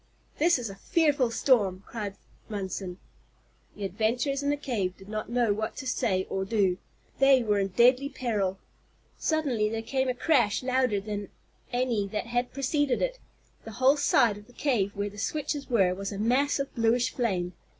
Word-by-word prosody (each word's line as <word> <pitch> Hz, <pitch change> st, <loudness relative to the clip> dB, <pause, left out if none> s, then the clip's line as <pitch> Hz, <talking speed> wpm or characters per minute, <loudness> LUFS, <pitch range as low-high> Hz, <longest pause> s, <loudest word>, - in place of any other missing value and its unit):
"This 335 Hz, +1 st, +4 dB
is 245 Hz, -2 st, -4 dB
a 195 Hz, -, -7 dB
fearful 285 Hz, -, +2 dB
storm," 205 Hz, -6 st, +2 dB
cried 205 Hz, -4 st, -5 dB, 0.3 s
Munson. 190 Hz, -3 st, -4 dB, 0.8 s
The 205 Hz, -, -7 dB
adventurers 230 Hz, +8 st, 0 dB
in 285 Hz, -, 0 dB
the 290 Hz, -, +1 dB
cave 215 Hz, -10 st, -2 dB
did 195 Hz, -, -14 dB
not 215 Hz, +1 st, -4 dB
know 240 Hz, -3 st, +2 dB
what 215 Hz, +2 st, -3 dB
to 270 Hz, -, -7 dB
say 190 Hz, -7 st, 0 dB
or 190 Hz, -, -2 dB
do. 190 Hz, -3 st, +1 dB, 0.4 s
They 270 Hz, -2 st, +6 dB
were 210 Hz, -2 st, +1 dB
in 195 Hz, -, +1 dB
deadly 250 Hz, +7 st, +4 dB
peril. 205 Hz, -9 st, -1 dB, 0.6 s
Suddenly 270 Hz, -10 st, +1 dB
there 225 Hz, 0 st, -3 dB
came 260 Hz, +2 st, 0 dB
a 250 Hz, -, -1 dB
crash 245 Hz, -7 st, +2 dB
louder 255 Hz, -5 st, +1 dB
than 205 Hz, 0 st, -5 dB, 0.4 s
any 245 Hz, -5 st, 0 dB
that 210 Hz, +3 st, -3 dB
had 245 Hz, +1 st, -1 dB
preceded 275 Hz, 0 st, 0 dB
it. -, -, -2 dB, 0.4 s
The 225 Hz, -, -9 dB
whole 260 Hz, +6 st, +4 dB
side 235 Hz, -7 st, +3 dB
of 210 Hz, -, -17 dB
the 245 Hz, -, -19 dB
cave 225 Hz, -8 st, 0 dB
where 200 Hz, 0 st, -1 dB
the 205 Hz, -, -10 dB
switches 290 Hz, +3 st, -3 dB
were 195 Hz, -7 st, +3 dB
was 195 Hz, +2 st, -5 dB
a 200 Hz, -, -5 dB
mass 250 Hz, +7 st, +2 dB
of 275 Hz, -1 st, -4 dB
bluish 235 Hz, +1 st, +2 dB
flame. 185 Hz, -8 st, -1 dB
230 Hz, 180 wpm, -28 LUFS, 200-265 Hz, 0.8 s, They